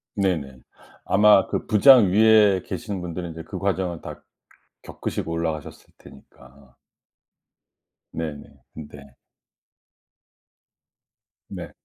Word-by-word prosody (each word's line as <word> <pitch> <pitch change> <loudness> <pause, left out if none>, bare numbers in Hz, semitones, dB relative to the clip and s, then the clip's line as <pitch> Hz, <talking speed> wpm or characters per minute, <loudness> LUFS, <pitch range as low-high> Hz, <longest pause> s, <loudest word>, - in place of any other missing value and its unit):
네네. 85 - -2 0.5
아마 105 0 +4
그 - - -4
부장 110 -2 +6
위에 105 -2 +4
계시는 100 -4 -6
분들은 90 0 -6
인제 80 0 -9
그 95 - -8
과정을 95 -3 -3
다 - - -10 0.6
겪으시고 85 - -6
올라가셨을 80 -3 -5
테니까. 65 -1 -19 1.4
네네. 80 -3 -6 0.3
네. 75 -3 -13 2.3
네. - - -9
90 Hz, 190 characters per minute, -22 LUFS, 75-100 Hz, 2.3 s, 부장